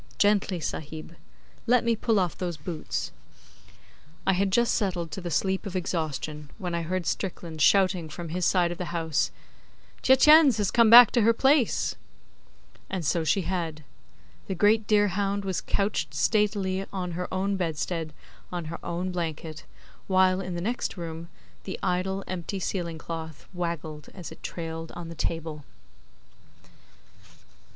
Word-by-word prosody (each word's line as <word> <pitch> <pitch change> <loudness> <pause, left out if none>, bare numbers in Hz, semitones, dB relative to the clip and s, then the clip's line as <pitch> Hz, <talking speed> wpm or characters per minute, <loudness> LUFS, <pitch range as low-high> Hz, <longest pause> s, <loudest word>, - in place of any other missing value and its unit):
Gently, 205 -3 +2
Sahib. 160 +1 -6 0.5
Let 245 0 +4
me 235 -1 +2
pull 225 -1 +1
off 180 -4 0
those 175 -3 -4
boots.' 155 +2 -4 1.1
I 190 - +4
had 195 +2 +1
just 235 +4 +3
settled 180 -6 -1
to 190 - -5
the 175 - -4
sleep 190 +5 0
of 190 - -6
exhaustion 155 -4 -3
when 180 -4 -4
I 170 - 0
heard 175 +2 -2
Strickland 170 -4 -3
shouting 185 -2 +4
from 170 +2 -7
his 180 +3 -2
side 175 0 +3
of 175 - -6
the 180 - -2
house 160 - 0 0.7
'Tietjens 275 -1 +7
has 205 -3 0
come 230 -2 +5
back 235 -1 +10
to 240 - +3
her 230 +2 +5
place!' 265 0 +2 1.0
And 185 -4 -3
so 165 +2 +1
she 185 +4 +2
had. 165 -4 -3 0.6
The 190 - -2
great 210 +3 +3
deerhound 200 -1 +1
was 190 -2 -1
couched 200 +1 -1
statelily 200 -3 +1
on 185 -2 -3
her 180 +2 -4
own 195 +1 0
bedstead 165 -2 -2 0.4
on 175 -2 -4
her - - -8
own 175 +2 -3
blanket, 160 -2 -5 0.4
while, 185 0 +3
in 185 -2 -5
the 170 - -3
next 230 +1 -2
room, 165 -1 -6 0.3
the 190 - -5
idle, 190 +1 0
empty, 185 +2 -4
ceiling 170 -3 -3
cloth 160 -2 -7
waggled 165 -4 -4
as 180 -4 -8
it - - -12
trailed 165 -1 -5
on 170 -1 -7
the - - -6
table. 160 -2 -3
180 Hz, 150 wpm, -27 LUFS, 165-200 Hz, 1.1 s, back